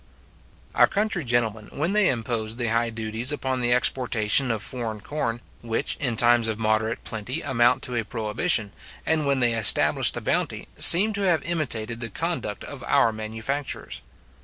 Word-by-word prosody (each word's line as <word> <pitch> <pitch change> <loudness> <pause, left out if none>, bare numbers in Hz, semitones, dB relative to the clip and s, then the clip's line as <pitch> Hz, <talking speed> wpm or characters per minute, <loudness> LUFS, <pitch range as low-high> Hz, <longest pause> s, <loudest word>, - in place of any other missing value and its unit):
Our - - +4
country 205 -4 -2
gentlemen, 115 -4 -1
when 160 +7 -2
they 210 -2 +3
imposed 115 -2 -3
the 120 -2 -2
high 115 +1 0
duties 110 +3 -3
upon 130 -3 -3
the 120 0 +1
exportation 125 -1 +2
of 110 -3 0
foreign 115 -4 -2
corn, 120 -4 -4 0.2
which 115 -1 -3
in 120 -5 -3
times 120 -1 +3
of 110 -1 -3
moderate 110 +1 -1
plenty 115 +7 -4
amount 120 -2 +1
to 125 - -4
a 115 - -1
prohibition, 110 - -1 0.3
and 155 -2 0
when 135 -2 0
they 120 -1 +3
established 115 -4 +4
the - - -5
bounty, - - -2
seem 205 +6 +7
to 200 - -4
have 175 -6 +1
imitated 120 -9 -3
the 115 -1 -6
conduct - - -5
of - - -9
our 115 - +2
manufacturers. 110 +6 -6
120 Hz, 165 wpm, -23 LUFS, 110-140 Hz, 0.3 s, seem